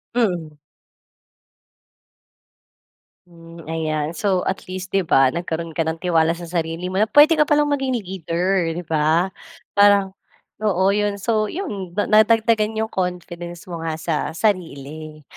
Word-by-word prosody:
Mhm. 175 -10 -1 2.7
Hmm, 165 -1 -14
ayan 155 -1 -2
so 185 0 0
at 190 - -3
least 185 0 -6
di 195 - +2
ba 135 -7 +3
nagkaroon 165 -1 -4
ka 160 0 -2
ng 160 - -1
tiwala 165 -2 +2
sa 175 - -9
sarili 170 +1 -3
mo 190 - -1
na 215 - +3
pwede 300 +6 +6
ka 300 - +4
palang 295 0 +2
maging 270 -2 0
leader 185 -3 -1
di 175 - -5
ba? 160 +3 +1 0.4
Parang 200 -1 +4 0.5
oo 190 -3 +1
yun 205 0 0
so 215 +2 0
yun 200 - -5
nadagdagan 220 +1 +3
yung 220 0 -2
confidence 175 -2 -4
mo 170 -2 -7
nga 160 -1 -3
sa 160 0 -2 0.2
sarili. 155 -6 -3
180 Hz, 135 wpm, -21 LUFS, 165-210 Hz, 2.7 s, pwede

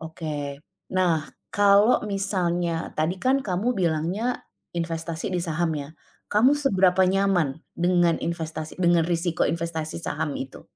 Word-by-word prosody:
Oke. 150 -3 -5 0.4
Nah, 165 -4 +2 0.3
kalau 205 +3 +5
misalnya, 180 -4 -1
tadi 160 +4 0
kan 265 +1 +2
kamu 205 +7 0
bilangnya, 180 +7 -1 0.3
investasi 165 -1 -3
di 180 - +1
saham 165 -1 -1
ya? 140 -1 -5 0.4
Kamu 235 +7 +5
seberapa 190 -10 +3
nyaman 185 -6 +2 0.2
dengan 175 -1 +3
investasi 160 -2 -4
dengan 175 -2 +4
risiko 170 0 0
investasi 165 -2 -3
saham 160 -2 -3
itu? 135 0 -7
170 Hz, 125 wpm, -25 LUFS, 160-195 Hz, 0.4 s, kalau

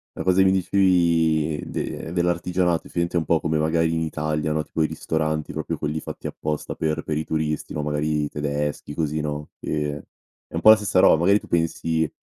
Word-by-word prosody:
la - - -4
cosa 95 0 +2
che 95 - +6
mi 95 - +5
dicevi 85 -5 +2
de 80 - -4
dell'artigianato 90 0 0
effettivamente 85 0 -1
è - - +4
un 80 - -3
po' 80 +2 +2
come 80 -1 0
magari 80 +1 +1
in 80 - 0
Italia, 75 -1 -1
no, 75 0 0
tipo 80 +1 -1
i - - +2
ristoranti 80 -1 -2
proprio - - -3
quelli 75 +1 -2
fatti - - -7
apposta 75 -1 -4
per 80 -1 -1
per 75 -1 -2
i 80 - -2
turisti, 75 -1 -2
no, 75 - -2
magari 75 0 0
i - - -5
tedeschi, 75 0 -3
così 80 -1 -1
no, 75 0 -4
ehm, 75 -1 -2 0.5
è - - -22
un - - -1
po' 110 - +7
la 110 - +10
stessa 100 -3 +1
roba. 80 - +6
Magari 100 +5 +4
tu - - -13
pensi 80 -1 0
80 Hz, 210 wpm, -23 LUFS, 75-85 Hz, 0.5 s, la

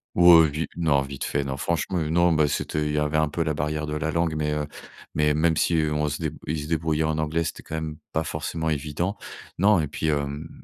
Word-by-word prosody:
Ouais, 85 -2 +8
vi 75 +3 -3
non, 75 -5 +3
vite 70 0 -6
fait, 70 0 -1
non. 65 0 -4
Franchement, 85 +4 -1
non 85 +2 +2
ben 75 -1 +3
c'était 75 +1 -1
il - - -1
y 75 - -1
avait 75 +1 +1
un 80 -1 +2
peu 85 +2 -1
la 75 -1 -1
barrière 75 +1 -2
de 75 - -4
la 80 +1 -1
langue, 85 -1 0
mais, 75 -1 -1
heu, 75 -1 -1 0.5
mais 75 0 +2
même 80 +1 +2
si 85 - +2 0.2
on 75 0 0
se 75 - -4
dé 80 -3 -1 0.2
ils 75 -1 -2
se 75 - -7
débrouillaient 80 -1 0
en 80 0 0
anglais, 80 +2 0
c'était - - -5
quand 80 - -7
même 80 -1 -4 0.2
pas 80 - +1
forcément 80 +2 -3
évident. 75 +6 -2 0.4
Non 100 -1 +5
et 75 - 0
puis 80 +2 -3
hem 75 +1 -2
80 Hz, 245 wpm, -25 LUFS, 75-80 Hz, 0.5 s, Ouais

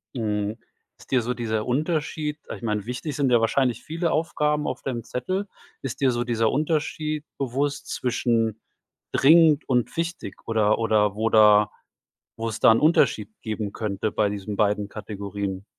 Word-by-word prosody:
Mhm. 105 -2 -2 0.4
Ist - - -18
dir 130 -2 +3
so 125 +2 -2
dieser 110 -3 -2
Unterschied 150 +2 -1 0.2
ich - - -12
meine, 105 -3 -2
wichtig 125 +4 -4
sind 140 -3 +2
ja 120 -2 +4
wahrscheinlich 125 +1 +1
viele 165 +2 -2
Aufgaben 150 -2 0
auf 130 - -3
deinem 120 -4 -4
Zettel. 185 - -3 0.3
Ist 135 -3 -5
dir 135 -2 +3
so 120 0 -1
dieser 115 -2 +1
Unterschied 155 0 -1
bewusst 140 +2 -2
zwischen 115 -3 0 0.5
dringend 155 +1 +5
und 125 -3 0
wichtig 165 - -3
oder 110 -1 +2
oder 105 -3 +2
wo 110 +1 0
da 105 -2 +6 0.7
wo 115 0 -3
es 110 0 -4
da - - +7
'n 115 - +2
Unterschied 135 -9 +3
geben 110 -2 -4
könnte 105 -1 -2
bei 105 0 +1
diesen 100 0 -5
beiden 105 -1 +1
Kategorien? 100 -2 -5
120 Hz, 160 wpm, -24 LUFS, 105-145 Hz, 0.7 s, da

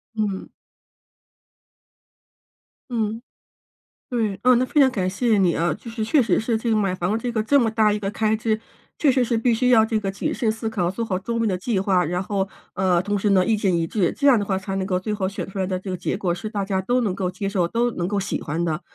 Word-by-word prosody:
嗯。 205 -3 -2 2.4
嗯。 225 -1 -2 0.9
对！ 220 -5 0
啊， 255 0 +6
那 245 +1 +3
非 290 +4 +1
常 270 -2 +6
感 190 -7 -1
谢 220 +3 +1
你 185 -4 +3
啊。 170 -1 +1
就 230 - -10
是 225 -1 -4
确 245 +7 +3
实 230 - +2
是 225 +1 0
这 225 +1 -2
个 - - +3
买 195 -3 +1
房 185 +2 -1
的 220 - +1
这 245 +2 -3
个 225 -2 0
这 280 +5 +4
么 225 -2 +2
大 215 -1 +3
一 210 - -1
个 195 -1 -3
开 215 +1 +1
支 220 0 0 0.4
确 285 -4 +4
实 255 -1 +2
是 235 -1 0
必 235 +2 +2
须 250 +2 +1
要 225 -3 +6
这 220 -1 0
个 195 -2 -2
谨 195 - -3
慎 225 - 0
思 225 +1 -3
考 180 -5 0
做 230 +5 -3
好 190 -5 -1
周 230 +5 -3
密 230 - +1
的 185 -3 0
计 210 +1 -1
划， 190 -1 +2
然 180 +3 -1
后， 195 0 -1 0.2
呃， 180 -2 +2
同 205 +1 -1
时 210 - 0
呢 190 -2 +4
意 225 - +2
见 195 -4 +1
一 165 -1 0
致。 185 -1 +1
这 285 - 0
样 265 -5 +6
的 205 - -2
话 190 - 0
才 195 0 -5
能 190 -1 -1
够 180 -2 0
最 210 +3 -4
后 195 -3 -1
选 200 - -5
出 195 0 -8
来 190 - 0
的 185 -1 -2
这 190 +1 -7
个 185 - -2
结 - - -2
果 180 -4 -1
是 215 +5 -5
大 205 -2 -2
家 190 -1 -1
都 245 +6 +1
能 200 -5 0
够 185 -1 -2
接 190 +2 -5
受、 180 -4 +1
都 235 +5 +1
能 175 -2 -2
够 205 - -1
喜 195 - -2
欢 160 +4 -2
的。 160 -1 -1
205 Hz, 285 characters per minute, -23 LUFS, 190-225 Hz, 2.4 s, 啊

